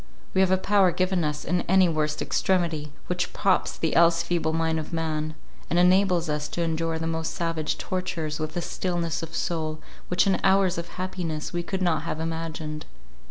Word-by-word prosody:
We 190 - +4
have 190 - +4
a 190 - +4
power 195 -1 +4
given 185 0 +1
us 150 -1 -2
in 175 +1 +1
any 190 0 +6
worst 155 -2 0
extremity, 165 -5 0
which 180 0 -2
props 195 -2 +1
the 160 - -1
else 170 0 +5
feeble 165 -3 0
mind 160 0 +1
of 155 - -6
man, 155 -2 -2 0.3
and 170 - +1
enables 180 -1 +4
us 150 -1 -1
to 170 - -2
endure 165 0 -1
the 160 - -3
most 160 0 -2
savage 165 -2 -1
tortures 175 -5 -3
with 155 +2 -3
a - - 0
stillness 170 -1 -2
of 165 0 -7
soul 155 -2 -2 0.3
which 180 +3 +3
in 195 -1 +2
hours 190 -2 +3
of 170 - -5
happiness 180 -4 -3
we 175 - 0
could 190 +2 -3
not 170 -3 +2
have 160 -1 -4
imagined. 160 -2 -4
165 Hz, 190 wpm, -26 LUFS, 160-180 Hz, 0.3 s, any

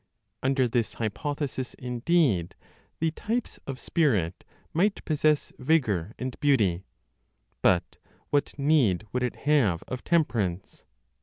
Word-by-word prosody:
Under 130 -1 +2
this 120 -1 -1
hypothesis, 130 +4 -3
indeed, 125 - +1 0.4
the 160 0 0
types 230 +8 -3
of 135 -2 -5
spirit 105 - +1 0.3
might 195 +5 +1
possess 155 -1 +1
vigor 120 - +1
and 130 0 -5
beauty. 105 -11 +2 0.8
But 90 -1 +2 0.3
what 145 -1 0
need 140 - +3
would 125 - 0
it 125 -1 -1
have 125 - +3
of 130 - -5
temperance? 110 - 0
130 Hz, 110 wpm, -27 LUFS, 105-150 Hz, 0.8 s, need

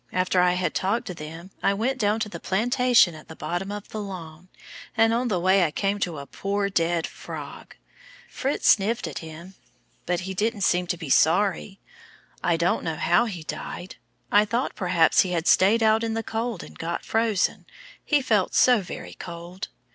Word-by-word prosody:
After 185 0 +2
I 180 0 +4
had 180 -3 -1
talked 230 +6 0
to 180 - -5
them, 165 +3 -9
I 200 - +2
went 255 +6 -1
down 210 0 +1
to 220 - 0
the 210 - -8
plantation 240 -1 +3
at 155 -1 -13
the 160 - -10
bottom 175 +5 -4
of 205 0 -7
the 215 - -5
lawn, 180 -4 -8 0.5
and 225 +1 +4
on 245 +2 0
the 195 -6 0
way 190 +2 +4
I 165 - +2
came 200 +6 -1
to 175 -5 -2
a 140 - -7
poor 200 +5 -2
dead 170 -2 +1
frog. - - -9 0.5
Fritz 275 +1 -2
sniffed 220 +3 +3
at - - -5
him, 165 +3 -10 0.5
but 180 +1 0
he 190 +1 -5
didn't 210 +2 -1
seem 180 -1 +2
to 175 - -1
be 160 -5 -6
sorry. 195 +5 +2 0.6
I 170 -1 +2
don't 170 +1 +1
know 165 -1 -2
how 175 +9 +3
he 180 -8 -6
died. 165 +4 -7 0.3
I 205 - +6
thought 230 +5 -1
perhaps 175 -3 +3
he 180 -2 -1
had 165 -1 -1
stayed 210 +6 +4
out 220 +1 +4
in 225 -1 -1
the 225 - -2
cold 225 -3 -3
and - - -13
got 170 +1 -4
frozen, 220 -3 0 0.4
he 290 -3 +2
felt 210 -6 +1
so 245 -4 +5
very 180 - -8
cold. 175 +2 -8
190 Hz, 195 wpm, -25 LUFS, 175-220 Hz, 0.6 s, I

